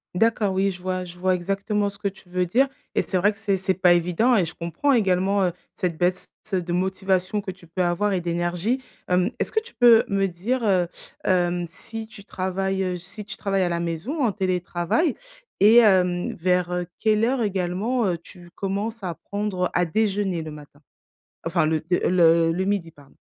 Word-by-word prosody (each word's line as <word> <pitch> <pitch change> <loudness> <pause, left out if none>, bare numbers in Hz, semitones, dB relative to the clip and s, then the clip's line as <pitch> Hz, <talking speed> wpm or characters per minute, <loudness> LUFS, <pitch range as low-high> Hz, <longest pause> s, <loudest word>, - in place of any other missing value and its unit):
D'accord. 220 -1 +2
Oui, 195 +1 +1
je 180 -1 -10
vois 185 0 -2
je 175 0 -11
vois 185 0 +2
exactement 200 +3 -1
ce 200 0 -11
que 205 - -1
tu 190 -2 -9
veux 180 0 0
dire 260 +10 +3 0.3
et - - +2
c'est 185 - -1
vrai 205 +4 +3
que 205 - -15
c'est 200 -3 0
c'est 190 0 0
pas 180 -1 +5
évident 180 +9 +2
et 195 - +3
je 160 - -8
comprends 170 - -1
également, 195 -2 +2
heu, 175 - +1 0.2
cette 175 -3 -2
baisse, 180 +1 +1 0.3
heu, 185 -2 0
de 175 0 -3
motivation 190 +2 0
que 195 -2 -5
tu 175 -2 -17
peux 180 +2 -1
avoir 175 +4 +1
et 185 - +1
d'énergie. 175 +8 -1 0.3
Hem, 180 +3 +2
est-ce - - -1
que 440 - +2
tu 475 +2 -15
peux 235 -2 +7
me 195 -1 +1
dire, 195 +8 -2
heu, 185 -5 +2 0.4
hem, 175 -1 +1
si 225 +6 -7
tu 205 -2 -13
travailles, 190 0 -2
heu, 180 -1 -2
si 190 +5 -9
tu 215 +2 -8
travailles 195 -2 0
à 180 - 0
la 170 0 -1
maison, 170 - -2
en 225 - +3
télétravail? 185 - 0 0.5
Et 210 +3 +7
hem, 180 -5 +4
vers, 180 0 0
heu, 180 0 -1
quelle 215 0 +2
heure 245 0 +1
également, 200 +5 0
heu, 175 -2 0
tu 175 +1 -14
commences 200 +3 -3
à 180 -2 -2
prendre 200 0 -3
à 180 - +3
déjeuner 195 -1 0
le 155 - -6
matin? 150 -1 -12 0.6
Enfin 165 -1 +1
le 155 0 +1
de, 180 - +4
heu, - - +2
le 165 -2 +4
le 185 +3 -1
midi, 195 -5 -1
pardon? 145 -3 -20
185 Hz, 210 wpm, -24 LUFS, 175-205 Hz, 0.6 s, peux